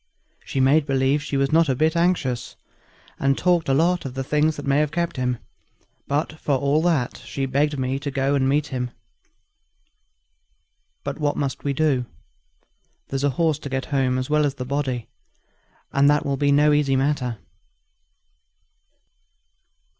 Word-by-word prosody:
She 135 - -3
made 140 +3 +4
believe 135 +1 +2
she 145 -1 -3
was 135 0 +1
not 165 -1 +4
a 130 - +2
bit 155 +5 +1
anxious, 135 -9 0 0.6
and 135 0 +2
talked 175 -4 +2
of 135 - +3
a - - +3
lot 175 +2 +2
of 135 -1 -6
things 150 +2 +1
that 145 - -7
might 140 0 +2
have 150 0 +2
kept 170 0 -2
him. 125 -2 -1 0.7
But 150 +2 -2
for 145 - 0
all 140 +3 +1
that 160 -8 0
she 135 - -3
begged 145 +2 0
me 130 +1 -1
to 145 0 -4
go 135 0 0
and 135 -1 +2
meet 150 +2 +1
him. 125 -2 -3 2.1
But - - -5
what 145 -1 0
must 140 -2 -3
we 140 - 0
do? 135 -4 +1 1.0
There's 135 -1 -2
the 145 - +2
horse 155 +2 0
to 140 - -7
get 135 0 -2
home 130 -2 +2
as 130 0 -2
well 150 0 +2
as 145 -1 0
the 125 - -5
body, 130 -3 -2 0.9
and 140 +1 +4
that 150 0 +2
will 140 - 0
be 140 +1 +1
no 150 +1 +4
easy 145 -2 +2
matter." 130 -3 0
140 Hz, 170 wpm, -23 LUFS, 135-150 Hz, 2.1 s, made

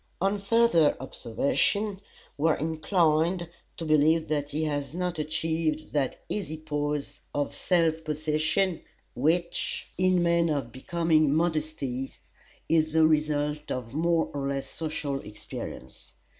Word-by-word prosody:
On 195 +2 +1
further 200 -6 +4
observation, 190 - 0 0.3
we 155 +3 +2
are 155 - +2
inclined 165 +2 +1 0.3
to 165 - -4
believe 155 +1 +3
that 145 -2 -1
he 150 +2 -2
has 145 -1 -2
not 180 -2 -2
achieved 155 0 -1
that 140 -4 -1
easy 160 -7 -3
poise 150 -2 -3 0.2
of 145 0 -1
self 165 -3 +1
possession 155 +4 0 0.3
which, 170 +6 0
in 185 -1 +3
men 170 -1 +3
of 140 -6 -1
becoming 155 +2 +2
modesty, 155 -5 -1 0.6
is 155 -1 +2
the 160 0 +6
result 150 -1 +1
of 120 -2 -4
more 165 +2 +1
or 140 -1 -2
less 135 -1 -2
social 150 -3 -3
experience. 105 - -9
155 Hz, 125 wpm, -28 LUFS, 145-170 Hz, 0.6 s, the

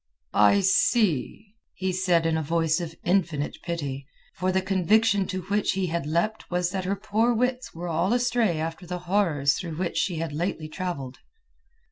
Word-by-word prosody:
"I 105 - +5
see!" 200 - +1 0.2
he 190 0 -1
said 180 -3 +2
in 165 -1 +2
a 160 - 0
voice 165 +2 +1
of 165 -1 -6
infinite 170 -5 0
pity; 140 -6 -4 0.3
for 185 +2 -1
the 190 - +2
conviction 195 +2 +2
to 185 -1 -4
which 205 +3 0
he 190 -1 0
had 170 -3 -2
leapt 170 +8 -1
was 180 0 0
that 190 -1 -3
her 195 +2 0
poor 220 +4 +1
wits 250 -1 -1
were 175 +2 -5
all 170 +4 0
astray 240 -7 +2
after 165 +3 -4
the 180 +1 -3
horrors 165 -7 +2
through 165 -4 -5
which 175 -1 -2
she 185 -3 0
had 160 -2 -3
lately 160 0 -2
travelled. 155 -6 -5
180 Hz, 175 wpm, -26 LUFS, 165-200 Hz, 0.3 s, I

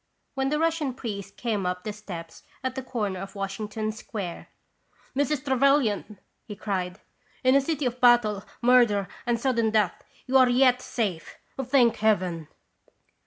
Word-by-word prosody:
" - - -49
when 270 0 0
the 300 - +1
Russian 320 -5 0
priest 200 -5 -6
came 220 -5 -1
up 180 0 -3
the 210 - -4
steps 180 -6 -9 0.2
at 260 -1 -1
the 265 - -4
corner 215 -7 -3
of 195 +1 -8
Washington 210 +2 -3
Square. 205 -5 -6 0.3
" - - -34
Mrs. 285 0 0
Trevelyan! 265 -6 +2 0.2
" - - -48
he 210 - -6
cried. 190 -3 -3 0.2
" - - -34
In 255 0 +5
a 275 - +5
city 295 0 -2
of 250 0 -2
battle, 230 -5 +4 0.2
murder, 235 -6 +4 0.2
and 235 -1 +1
sudden 235 -3 +1
death, 210 -4 +1 0.2
you 265 +1 +3
are 255 -1 +6
yet 250 0 +4
safe, 195 -11 -3 0.3
thank 250 -2 +3
Heaven 185 -7 +1
225 Hz, 165 wpm, -26 LUFS, 200-260 Hz, 0.3 s, are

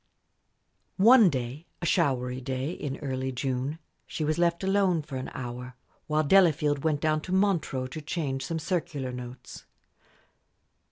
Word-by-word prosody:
One 225 0 +7
day 130 +3 -4
a 175 - -4
showery 130 -5 +1
day 130 +3 -3
in 140 -5 -5
early 130 -1 -2
June 130 +3 -2 0.3
she 155 - -3
was 155 +2 0
left 170 +1 +2
alone 190 -4 +2
for 140 -2 -8
an 130 - -4
hour, 125 -1 -6 0.3
while 155 0 +2
Delafield 150 -4 +4
went 155 -2 +1
down 155 0 +1
to 180 - -7
Montreux 185 -9 +1
to 155 - -6
change 145 -4 -3
some 165 +4 -3
circular 160 -5 -2
notes. 125 0 -9
145 Hz, 145 wpm, -28 LUFS, 130-170 Hz, 0.3 s, One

